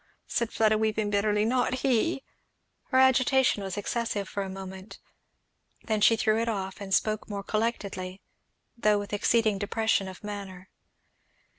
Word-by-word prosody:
said 235 -1 -1
Fleda 215 -1 +3
weeping 215 -1 0
bitterly, 210 +1 +2
"not 250 +2 +1
he 270 +3 +1 0.3
" - - -48
Her 260 - +2
agitation 260 -3 +4
was 195 0 -5
excessive 205 -1 -2
for 200 - -4
a 195 - -4
moment; 190 +1 -8 0.9
then 215 -2 -1
she 225 +2 +6
threw 220 0 +2
it 230 - -1
off, 190 -2 -4
and 195 -1 -7
spoke 215 +2 +1
more 200 -1 -4
collectedly, 200 -4 -2 0.6
though 215 -3 +3
with 205 0 -5
exceeding 215 0 +2
depression 210 -1 0
of 185 +1 -10
manner. 200 -3 -7
210 Hz, 150 wpm, -28 LUFS, 200-230 Hz, 0.9 s, she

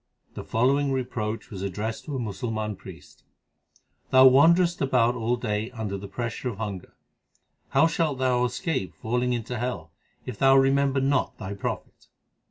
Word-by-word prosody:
The - - -7
following 135 +4 +1
reproach 120 -4 -3
was 95 -3 -6
addressed 105 +4 -4
to 145 - -5
a - - -2
Musal 115 +1 -4
man 110 -1 -3
priest: - - -14 0.9
Thou 130 0 +7
wanderest 170 +7 +5
about 125 -3 +3
all 120 0 0
day 110 -2 -2
under 110 -5 -5
the 100 +1 -7
pressure 120 +4 -4
of 105 - -7
hunger: 100 -4 -6 0.7
How - - +4
shalt 165 -3 0
thou 125 -1 +1
escape 125 - -2
falling 125 +2 -1
into 120 0 -3
hell, 115 -10 -4 0.3
if 105 - -7
thou 135 0 +6
remember 135 0 +3
not 135 0 0
thy 95 +2 -6
Prophet 100 - -6
125 Hz, 160 wpm, -26 LUFS, 110-135 Hz, 0.9 s, Thou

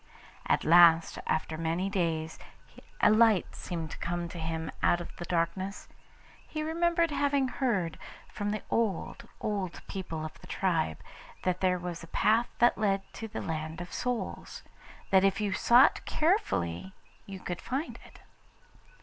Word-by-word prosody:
At - - +2
last, 165 0 +6
after 160 0 -1
many 165 +3 -1
days, 165 -5 -1 0.6
a - - +6
light 215 -4 +4
seemed 165 -3 -5
to - - -8
come 175 0 -2
to 170 - -8
him 160 0 -3
out 175 - +3
of 175 - -8
the 175 - -6
darkness. 175 +3 -2 0.6
He 310 -1 -4
remembered 335 +1 +1
having 285 -2 +1
heard 200 - -1 0.3
from 205 0 -4
the 210 -1 -3
old, 220 -6 -1
old 195 -4 -3
people 165 -5 -5
of 155 - -9
the - - -13
tribe, 165 - 0 0.5
that 185 -1 0
there 185 -1 +3
was 175 -1 -5
a - - -9
path 225 +7 +2
that 240 -1 +4
led 195 -2 +1
to 225 - -6
the 220 - -5
Land 160 0 -4
of 175 0 -7
Souls 250 -1 -4 0.5
that 190 -1 +6
if 195 +1 +2
you 205 -2 0
sought 240 +6 +5
carefully 190 - 0 0.3
you 195 -1 -7
could 175 -2 -5
find 270 +6 -4
it. - - -16
185 Hz, 155 wpm, -30 LUFS, 165-225 Hz, 0.6 s, last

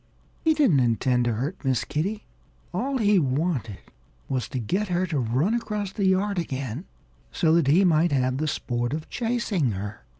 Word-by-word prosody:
He 320 -1 +2
didn't 260 - +4
intend 125 +1 +2
to 120 - +1
hurt 140 - -4
Miss 130 -3 +1
Kitty. 200 +8 -3 0.5
All 265 +9 -1
he 210 -4 +4
wanted 135 - -1 0.5
was 130 -4 -2
to 135 - -5
get 185 - -1
her 180 0 0
to 160 -6 -1
run 130 - +1
across 210 -4 -2
the 200 -1 -1
yard 190 +1 +1
again, 135 - -4 0.5
so 160 -2 +2
that 165 -4 +3
he 175 +7 +5
might 170 0 +3
have 130 -2 +1
the 155 - 0
sport 120 -3 -2
of 155 0 -5
chasing 225 - 0
her. 100 -1 -6
155 Hz, 175 wpm, -25 LUFS, 130-200 Hz, 0.5 s, he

